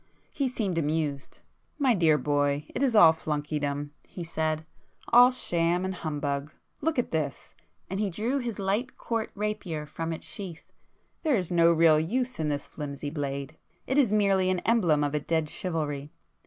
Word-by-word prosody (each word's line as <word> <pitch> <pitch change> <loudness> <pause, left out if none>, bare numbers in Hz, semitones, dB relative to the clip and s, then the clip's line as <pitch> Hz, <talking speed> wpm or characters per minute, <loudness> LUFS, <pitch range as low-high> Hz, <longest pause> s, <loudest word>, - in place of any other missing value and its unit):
He 275 - 0
seemed 205 -9 -1
amused. 150 -2 -2 0.4
"My 270 -4 +3
dear 165 -6 +4
boy, 145 0 0
it - - -3
is 260 -5 +2
all 165 -6 +8
flunkeydom;" 145 -2 -3 0.2
he 175 - -7
said—"All 160 +9 +2
sham 175 -7 0
and 190 - -2
humbug. 145 -3 -3 0.3
Look 320 0 0
at 245 - 0
this—" 150 -4 -3 0.3
and 190 +2 -4
he 210 -1 +1
drew 230 +10 -1
his 235 -5 -4
light 205 +6 -1
court 225 -2 -2
rapier 205 -7 -3
from 165 +2 -4
its 160 - -6
sheath—"There 200 - -5
is 180 -5 -1
no 170 -1 +5
real 165 -2 +5
use 245 +10 -1
in 155 -1 0
this 145 -1 -2
flimsy 145 -1 -6
blade,—it 140 - -5
is 245 -7 +3
merely 195 -3 +3
an 185 -1 0
emblem 175 -11 +3
of 145 0 -2
dead 160 -2 +1
chivalry. 150 -4 -3
165 Hz, 155 wpm, -28 LUFS, 150-210 Hz, 0.4 s, all